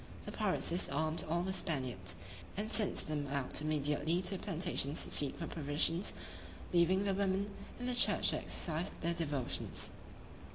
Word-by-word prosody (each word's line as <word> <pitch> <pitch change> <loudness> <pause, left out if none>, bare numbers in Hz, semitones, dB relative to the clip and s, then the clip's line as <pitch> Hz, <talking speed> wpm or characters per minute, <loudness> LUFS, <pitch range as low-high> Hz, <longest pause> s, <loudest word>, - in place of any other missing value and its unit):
The - - -5
pirates - - 0
disarmed 160 -1 +1
all 170 +2 +1
the 190 +1 -1
Spaniards, 130 - -2 0.4
and 215 +2 -2
sent 215 -4 +4
them 150 -2 -2
out 140 0 -1
immediately 150 +2 +1
to 180 - -2
the 195 - -4
plantations 160 -4 0
to - - -3
seek 140 -2 +3
for 165 - -4
provisions, 160 +4 +1 0.6
leaving 180 +3 +4
the 200 -1 +1
women 200 +1 0 0.3
in 245 - -4
the 250 - 0
church 245 - +5
to - - +1
exercise 170 +3 0
their 170 0 +1
devotions. 145 -7 -1
165 Hz, 160 wpm, -35 LUFS, 145-190 Hz, 0.6 s, church